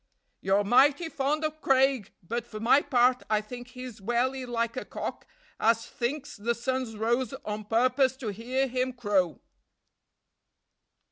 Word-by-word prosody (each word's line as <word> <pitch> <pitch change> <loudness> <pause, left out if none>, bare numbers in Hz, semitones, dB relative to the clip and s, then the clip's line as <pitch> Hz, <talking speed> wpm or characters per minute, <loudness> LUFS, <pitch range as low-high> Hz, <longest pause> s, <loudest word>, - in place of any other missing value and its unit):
"You're 195 +2 +2
mighty 285 - +4
fond 300 +2 0
o' 310 - 0
Craig; 270 -6 +2
but 235 +6 -3
for 215 - -7
my 240 +6 +5
part, 250 -1 +3
I 215 -1 +3
think 245 +3 -8
he's 250 -4 -9
welly 250 +4 0
like 235 -1 -1
a 255 - -3
cock - - -6 0.3
as 230 0 +3
thinks 280 +4 -4
the 235 +3 -1
sun's 245 -2 -2
rose 240 +4 0
o' 215 0 -3
purpose 255 +4 +2
to 240 -5 -4
hear 245 +6 -1
him 255 0 -1
crow." 205 -8 0
245 Hz, 145 wpm, -28 LUFS, 225-260 Hz, 0.3 s, my